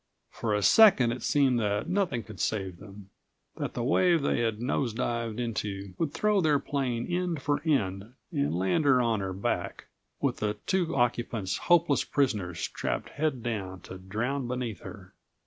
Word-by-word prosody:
For 110 -2 -1
a 105 - 0
second 185 - +6
it 120 0 -4
seemed 135 -3 +2
that 105 -1 -1
nothing 175 - 0
could 110 -4 -11
save 95 -4 -2
them, 100 +2 -13 0.5
that - - -4
the 120 - -2
wave 165 +4 +3
they 140 - +1
had 115 -2 0
nose 120 -1 -1
dived 115 -2 -2
into 100 -5 -3
would 160 -4 0
throw 210 +3 +2
their 155 -3 +3
plane 130 -5 -2
end 175 -5 -2
for 145 0 0
end 110 - -1 0.2
and 70 +4 0
land 95 - +1
her 135 -3 +5
on 115 -3 +1
her 95 -1 -3
back, 95 +2 -3 0.3
with - - -1
her 105 0 -1
two 180 -5 0
occupants 120 -5 0
hopeless 170 -4 +4
prisoners 105 - -1
strapped - - -3
head 145 -5 -2
down 95 -6 -4
to 95 - -10
drown 120 +8 -2
beneath 125 -4 -3
her. - - -11
120 Hz, 170 wpm, -28 LUFS, 105-145 Hz, 0.5 s, second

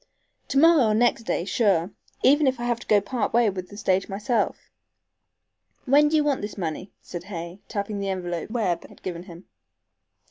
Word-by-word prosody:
"To - - -1
morrow 320 -3 +6
or 215 - +2
next 235 0 +2
day 175 - -1
sure, 195 -5 +1 0.3
even 290 +2 +5
if 260 -2 +1
I - - -4
have 240 -1 0
to - - -13
go 210 - +5
part 235 +3 -2
way 235 -3 +4
with 185 -1 -7
the 205 - -11
stage 190 -2 0
myself. 210 +5 -2 1.1
When 290 +3 +5
do 315 - +1
you 305 - +4
want 290 -3 0
this 205 +1 -6
money?" 180 +1 -4
said 175 0 -7
Hay, 175 -1 -7
tapping 200 -1 -3
the 200 0 -2
envelope 175 -2 -3
Webb 200 -8 -1
had - - -19
given 175 -2 -4
him. 170 +2 -12
205 Hz, 190 wpm, -25 LUFS, 185-240 Hz, 1.1 s, morrow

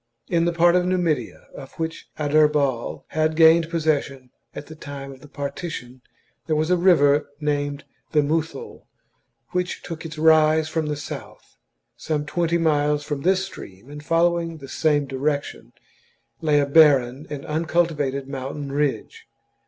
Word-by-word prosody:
In 170 -1 +2
the 175 - +2
part 170 +1 +4
of 180 - +3
Numidia 180 -4 -1
of 135 -1 -11
which 160 0 -5
Adherbal 150 -4 +1
had 155 0 0
gained 160 0 +5
possession 145 -6 -1 0.2
at - - -7
the 160 - -11
time 140 -3 -8
of 135 - -13
the 150 - -13
partition 140 -3 -6 0.5
there 155 - +1
was 155 +3 0
a - - +5
river 150 -5 +4
named 145 -1 -2 0.3
the 150 -1 +3
Muthul, 160 - -3 0.6
which 180 0 -2
took 165 -2 -7
its 155 -1 -8
rise 155 0 +4
from 160 -1 -2
the 150 - -2
south. 145 - -9 0.4
Some 150 -2 -2
twenty 170 +2 0
miles 150 -2 +1
from 145 -2 -4
this 190 +3 +2
stream, 115 - -12
and 150 0 -9
following 165 +1 +1
the 135 -2 -11
same 145 0 +1
direction, 140 +2 -3 0.7
lay 150 -2 +3
a 145 - +2
barren 140 -3 +4
and 145 -2 -6
un 155 +2 -2
cultivated 145 -6 0
mountain 135 +1 -5
ridge. 140 -6 -2
150 Hz, 150 wpm, -23 LUFS, 145-165 Hz, 0.7 s, gained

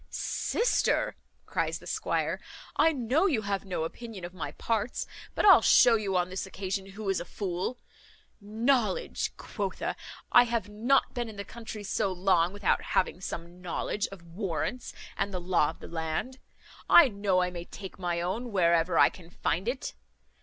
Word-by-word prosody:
"Sister," 475 - 0 0.3
cries - - -1
the - - -15
squire, - - -1 0.4
"I 325 - +5
know 280 - +2
you 250 - +1
have 200 0 -2
no 180 -4 -2
opinion 205 +2 -6
of 175 - -8
my 180 - -5
parts; 225 0 -1 0.3
but - - +1
I'll 395 - +9
shew 240 -2 +6
you 200 -4 0
on 180 0 0
this 185 +1 -3
occasion 190 0 -4
who 200 +2 -7
is 195 -1 +1
a - - -4
fool. 185 +5 -3 0.6
Knowledge, 235 - 0
quotha! - - -3 0.4
I 245 - +8
have 235 -4 -1
not 235 +6 +2
been 240 -2 -3
in 215 - -9
the 200 0 -6
country 225 -2 -8
so 195 0 0
long 180 -2 +2
without 205 -1 +1
having 185 -1 0
some 175 0 -7
knowledge 180 +3 -2
of 195 -3 -12
warrants 190 +7 -3 0.3
and 200 - -1
the 185 - -3
law 175 -4 +2
of - - -8
the - - -8
land. 165 +11 -3 0.5
I 335 - +9
know 200 -4 +1
I 180 - -1
may 175 -1 -6
take 190 0 -9
my 175 -2 -1
own 220 +8 -3
wherever 170 -2 +3
I - - +7
can 170 -3 -14
find 180 +2 -2
it. 255 +2 -2
195 Hz, 175 wpm, -29 LUFS, 180-230 Hz, 0.6 s, I'll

